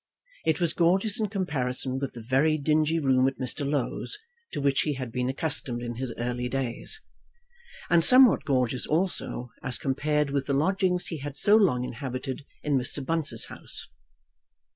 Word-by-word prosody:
It 160 - +2
was 170 -3 +4
gorgeous 190 +6 +3
in 215 - 0
comparison 130 -9 -1
with 140 -1 -4
the 120 - -9
very 135 +6 +2
dingy 155 +2 +1
room 130 -4 +3
at 135 - -2
Mr. 140 +2 -1
Low's 145 - -1 0.3
to - - -4
which 140 -1 +2
he 150 -2 -1
had 130 -3 -5
been 125 +1 -1
accustomed 130 -4 -2
in 120 -1 -5
his 130 -1 -3
early 125 +1 -2
days, 135 - -3 0.8
and 170 -1 +4
somewhat 255 +2 +7
gorgeous 125 -2 0
also 155 -7 -1
as 125 -3 -1
compared 150 +2 0
with 140 -1 -1
the 140 - +1
lodgings 180 +4 +1
he 165 - -4
had 145 0 -6
so 205 +8 +5
long 175 - +3
inhabited 130 +2 -5 0.2
in 145 -3 +1
Mr. 130 +2 -1
Bunce's 165 -1 0
house. - - -4
140 Hz, 165 wpm, -27 LUFS, 130-165 Hz, 0.8 s, somewhat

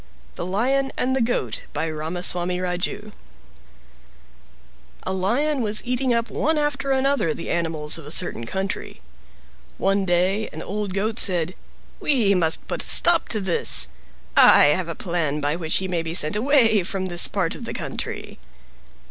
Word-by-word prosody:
THE 65 - -5
LION 265 +8 0
AND 260 +1 0
THE 265 - 0
GOAT 225 - -2
By 165 - -2
Ramaswami 175 +3 -1
Raju 180 +4 -3 1.9
A 190 - -3
lion 250 +10 0
was 210 -1 +1
eating 250 +1 0
up 230 -2 0
one 315 +8 0
after 295 -2 -2
another 270 - +1
the - - -5
animals 160 -2 -1
of 150 - -11
a - - -7
certain 155 -8 0
country. 190 +7 -4 0.8
One 195 +1 +1
day 185 +4 +1
an - - -7
old 205 -1 -4
Goat 215 +2 -1
said, 175 -2 +1 0.5
"We 235 -9 +2
must 165 -3 +2
put - - -3
a - - -2
stop 345 -1 +4
to 220 - 0
this. 190 -4 +2 0.5
I 145 - +7
have 180 +1 -2
a 165 - -4
plan 170 -6 -2
by 145 +1 0
which 165 -2 0
he 190 - -2
may 175 -2 -1
be 165 0 -4
sent 155 0 +5
away 225 -3 +3
from 190 +1 -4
this 175 -2 +2
part 185 -5 -2
of - - -9
the - - -5
country." - - -5
190 Hz, 165 wpm, -22 LUFS, 170-230 Hz, 1.9 s, I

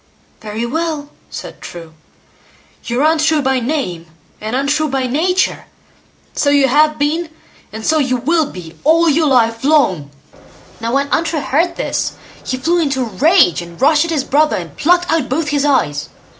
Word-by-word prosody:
"Very 220 +2 -4
well!" 305 +2 -3 0.2
said - - -9
True, 165 -2 -10 0.9
"you're 245 +3 -1
Untrue 315 -1 +2
by 265 -1 +1
name 230 - -3 0.3
and 220 +3 -3
untrue 285 +3 0
by 265 -1 -1
nature; 355 +9 0 0.7
so 285 - +1
you 285 -1 +4
have 300 +3 +3
been, 315 +3 -1 0.4
and 220 +1 -7
so 315 0 +2
you 255 -3 +1
will 315 +5 +1
be 170 -3 -10
all 330 +3 +4
your 310 +1 +3
life 230 -3 +2
long." 250 - +2 0.7
Now 230 +1 -3
when 280 +1 +1
Untrue 325 -1 0
heard 325 +6 0
this, - - -2 0.3
he 255 - -3
flew 335 +7 +1
into 280 -5 0
a 225 -6 -4
rage, 310 - +4
and 170 0 -11
rushed 300 +4 +4
at - - -5
his 305 -5 0
brother, 300 +3 +2
and - - -6
plucked 350 +3 +2
out 320 -5 0
both 295 +3 -1
his 285 0 0
eyes. 150 - 0
285 Hz, 170 wpm, -16 LUFS, 240-315 Hz, 0.9 s, you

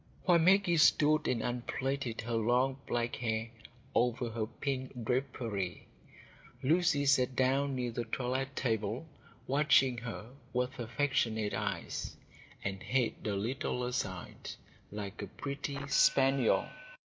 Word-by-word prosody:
While 175 -2 +5
Maggie 180 0 +4
stood 155 0 +5
and 115 -3 0
unplaited 125 0 -2
her 120 +2 -4
long 125 +4 +2
black 120 0 -1
hair 115 -1 -2 0.4
over 120 0 +1
her 110 -1 -2
pink 130 -2 -4
drapery, 115 -7 -2 0.8
Lucy 150 -1 +3
sat 130 -2 +3
down 135 +2 +2
near 125 -2 -2
the 120 +1 -3
toilette 130 +3 -2
table, 115 +3 -1 0.4
watching 135 -3 +3
her 115 -1 -7 0.2
with 125 +1 -1
affectionate 115 -3 0
eyes, - - -3 0.5
and 95 -1 -3
head 125 -3 +1
a 105 -2 0
little 125 +4 -2
aside, 125 -8 -4 0.4
like 105 0 -6
a 100 - -4
pretty 140 +5 -5
spaniel. 135 -2 +4
125 Hz, 120 wpm, -32 LUFS, 115-135 Hz, 0.8 s, While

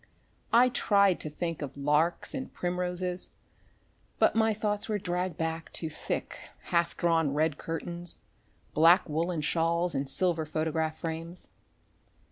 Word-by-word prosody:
I 245 +2 +6
tried 200 -6 +3
to 155 - -5
think 165 +2 -4
of 140 -1 -6
larks 150 +4 +1
and 265 -1 -4
primroses, 180 0 -2 0.9
but - - +4
my 225 0 +3
thoughts 210 0 -1
were 210 - +1
dragged 180 -2 -2
back 160 0 -3
to 160 -2 -3
thick, - - -4 0.3
half 170 0 +2
drawn 165 -4 +2
red 155 -1 +1
curtains, 170 +1 -5 0.6
black 165 +5 +6
woolen 165 +1 -1
shawls 170 +3 +1
and 135 -1 -2
silver 165 0 0
photograph 160 0 -1
frames. 165 +2 -4
170 Hz, 130 wpm, -29 LUFS, 160-180 Hz, 0.9 s, I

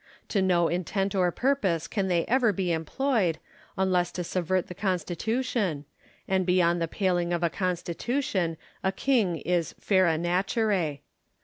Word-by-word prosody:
To 200 - +1
no 175 -3 +3
intent 190 +3 -1
or 180 -3 +2
purpose 195 - 0
can 195 0 -1
they 175 -2 +1
ever 245 -2 +3
be 185 -2 -1
employed, 175 - 0 0.4
unless 180 -2 +1
to 180 - -3
subvert 185 +1 0
the - - -8
Constitution; 185 - -1 0.4
and 190 -1 +2
beyond 175 -1 +2
the 165 - +1
paling 175 -1 0
of 175 0 0
a 170 - +2
Constitution 180 - -1 0.3
a 190 - +2
king 205 -5 +1
is 175 -2 -1
/era 185 -5 +3
naturoe. 180 - 0
180 Hz, 140 wpm, -27 LUFS, 170-200 Hz, 0.4 s, no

